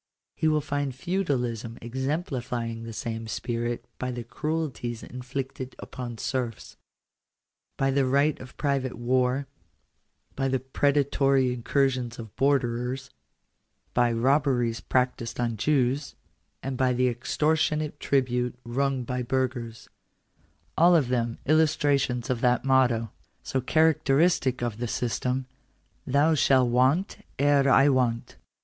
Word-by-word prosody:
He 160 - 0
will 155 -1 +3
find 145 -3 -2
Feudalism 125 - -2
exemplifying 125 -3 -3
the 115 0 -7
same 115 +1 -5
spirit 120 +1 -3
by 130 - -2
the 120 -1 -4
cruelties 130 -3 -3
inflicted 130 +1 -6
upon 120 -2 -7
serfs; 120 -2 -4 1.0
by 135 0 +2
the 135 -1 +2
right 140 +3 +2
of 130 0 -12
private 135 -4 -1
war; 125 +3 +1 0.9
by 135 0 0
the 130 0 +1
predatory 135 -1 +2
incursions 125 -1 0
of 110 -3 -9
borderers; 130 -1 0 0.8
by 120 -1 +3
robberies 125 -1 +1
practised 125 -2 -1
on 120 -2 0
Jews; 135 +3 0 0.5
and 135 -1 -3
by 130 -1 +2
the 125 +1 +2
extortionate 150 +5 0
tribute 125 -2 0
wrung 130 +1 -1
from 125 0 -2
burghers 120 -3 -2 0.5
— - - -39
all 175 +2 +7
of 145 -7 +2
them 120 -2 0
illustrations 145 -5 +2
of 120 -2 -2
that 125 +1 +2
motto, 120 -5 +3 0.3
so 130 - -1
characteristic 150 -2 +2
of 115 -2 -3
the 120 - -2
system, 125 +3 -1 0.3
" - - -37
Thou 145 +4 +3
shalt 130 -3 +4
want 130 +10 +1
ere 140 0 +4
I 135 +1 +6
want." 125 -3 0
130 Hz, 125 wpm, -26 LUFS, 120-140 Hz, 1.0 s, all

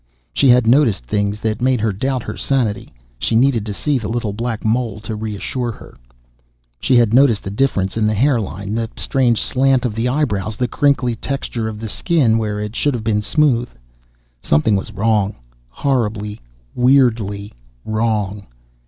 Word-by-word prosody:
She 135 - +3
had 125 -1 +5
noticed 115 - +3
things 100 - -1
that 110 +1 -2
made 130 -1 +2
her 110 -1 0
doubt 130 +4 -2
her - - -6
sanity; 125 -7 -1 0.3
she 110 - 0
needed 120 -3 +2
to 105 - -3
see 145 +5 0
the 110 - -5
little 115 -3 -2
black 115 0 -4
mole 110 -1 0
to 110 0 -5
reassure 110 +3 -3
her... - - -14 0.8
She 130 - +2
had 115 -2 +4
noticed 125 -4 +4
the 95 - -5
difference 100 -5 0
in 110 -1 +1
the 110 - +1
hair 125 +2 +2
line, 100 +1 -5
the 115 0 -2
strange 125 -4 +1
slant 130 -1 +2
of 120 - -1
the 115 +3 -1
eyebrows, 110 -7 -1
the 125 - 0
crinkly 135 -3 +1
texture 120 -2 -3
of 110 -1 -6
the 110 - -5
skin 120 - +1
where 105 -2 -2
it 105 +2 -5
should 145 -3 +1
have 115 - -4
been 105 -1 +1
smooth... 125 0 +2 0.7
Something 75 +9 +2
was 100 +3 -3
wrong... 105 -1 +1 0.3
horribly, 105 - -2 0.3
weirdly 115 -6 +2 0.3
wrong 105 -2 -1
115 Hz, 170 wpm, -18 LUFS, 105-125 Hz, 0.8 s, had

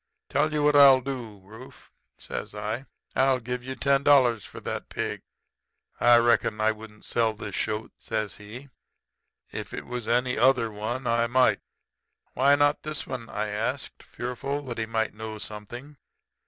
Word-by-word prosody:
Tell 150 +3 +1
you 150 -1 0
what 150 0 +4
I'll 135 -2 +8
do, 120 -6 -6
Rufe,' 110 +6 -14
I - - -23 0.2
says. - - -14 0.6
'I'll 130 -1 +3
give 125 +1 -4
you 130 +1 -5
ten 140 0 +2
dollars 125 -7 +4
for - - -10
that - - -5
pig.' - - -3 0.8
"'I 120 0 +7
reckon 120 -2 +2
I 110 +1 +3
wouldn't 110 -1 -12
sell 115 -2 +1
this - - -7
shoat,' 110 0 -2
says 105 -3 -3
he. 115 +7 -10 0.8
'If - - -6
it - - -6
was 125 -2 -5
any 125 +1 +1
other 125 -4 +4
one 115 +5 -4
I 115 0 +2
might.' 130 +2 +3 0.7
"'Why 140 +3 +5
not 145 +1 +2
this 155 -1 -4
one?' 120 -4 -6
I 105 0 -2
asked, 115 +6 -3
fearful 135 +4 -4
that 120 -4 -5
he 110 - -2
might 110 -1 -1
know 110 0 -6
something. 120 +8 -8
120 Hz, 165 wpm, -26 LUFS, 110-135 Hz, 0.8 s, I'll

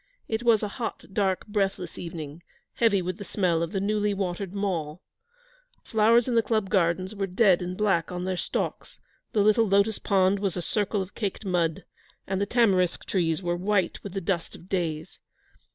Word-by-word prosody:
It 220 0 -1
was 230 -3 +4
a - - 0
hot, 225 - -4
dark, 190 -2 0
breathless 195 -4 -2
evening, 165 -2 -7 0.3
heavy 205 -5 +2
with 185 +1 -4
the - - -5
smell 180 -5 0
of 170 0 -2
the 195 - -1
newly 205 +1 0
watered 190 -1 -3
Mall. 180 -6 -3 0.8
The - - -22
flowers 225 +2 +4
in 250 - 0
the 230 - +5
Club 215 -3 -1
gardens 185 +1 +1
were 200 -2 -2
dead 185 -1 +4
and 180 +1 -4
black 195 -7 +1
on 180 0 -4
their 185 0 -1
stalks, - - -3 0.3
the 210 - +3
little 215 +2 +4
lotus 200 +2 +2
pond 195 -1 +2
was 195 -3 -1
a - - -1
circle 205 +2 0
of 190 - -13
caked 205 -1 -4
mud, 170 -4 0 0.4
and 190 0 -2
the 200 - 0
tamarisk 195 -7 +2
trees 170 -2 0
were 175 0 0
white 185 0 0
with 200 - -7
the 195 - -2
dust 170 -2 -2
of 175 - -14
days. 165 -4 -3
195 Hz, 190 wpm, -26 LUFS, 175-210 Hz, 0.8 s, the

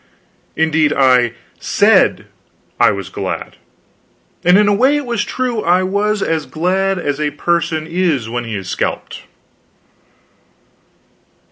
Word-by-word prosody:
Indeed, 160 -1 +2
I 125 -3 +3 0.3
said - - +3 0.5
I - - +5
was 100 -3 -4
glad. - - -5 0.9
And 180 +2 +5
in 210 0 +4
a 205 - +3
way 260 +8 +3
it 290 - -4
was 235 -3 -1
true; 250 -4 -2
I 180 0 +2
was 205 +2 0
as 160 -3 -2
glad 190 +7 0
as 145 -4 -3
a 150 - +1
person 165 +1 -1
is 165 -8 -1
when 120 +1 -4
he 115 -2 -5
is 95 -2 -6
scalped. - - -4
170 Hz, 130 wpm, -16 LUFS, 140-195 Hz, 0.9 s, I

